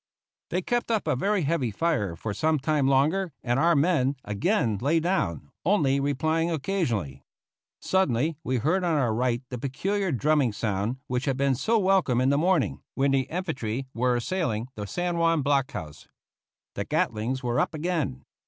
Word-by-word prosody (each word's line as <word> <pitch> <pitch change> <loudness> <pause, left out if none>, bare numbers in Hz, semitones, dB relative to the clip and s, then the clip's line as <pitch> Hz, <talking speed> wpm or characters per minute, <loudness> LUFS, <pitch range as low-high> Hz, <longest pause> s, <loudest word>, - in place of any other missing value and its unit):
They 180 +1 -1
kept 240 +4 -1
up 220 -3 0
a 155 -3 +1
very 200 +6 +1
heavy 140 -5 0
fire 105 - -1
for 105 +5 -4
some 155 +8 +1
time 145 0 +1
longer, 155 +7 +2
and 120 +1 +1
our 170 +2 +4
men 145 -3 +2
again 110 - 0
lay 150 +6 +2
down, 85 - -1
only 145 -7 +2
replying 155 +4 0
occasionally. 140 - -2 0.6
Suddenly 160 -5 +1
we 130 0 0
heard 160 - +1
on 170 -3 +1
our 120 -6 +1
right 120 +1 0
the 125 - -5
peculiar 190 - -1
drumming 145 -3 +2
sound 105 +3 -2
which 125 0 -2
had 135 -3 0
been 140 0 +2
so 220 - +1
welcome 190 - +2
in 130 +1 +3
the 140 - +3
morning, 175 -3 +1
when 140 0 +2
the 135 -1 +1
infantry 135 -9 -3
were 125 +1 +1
assailing 120 - -2
the 105 -1 -6
San 175 - -2
Juan 165 -3 +2
block 140 -1 +1
house. 75 -2 -8 0.7
The - - -3
Gatlings 120 +5 -1
were 120 0 0
up - - 0
again! 155 - -2
140 Hz, 170 wpm, -26 LUFS, 120-170 Hz, 0.7 s, our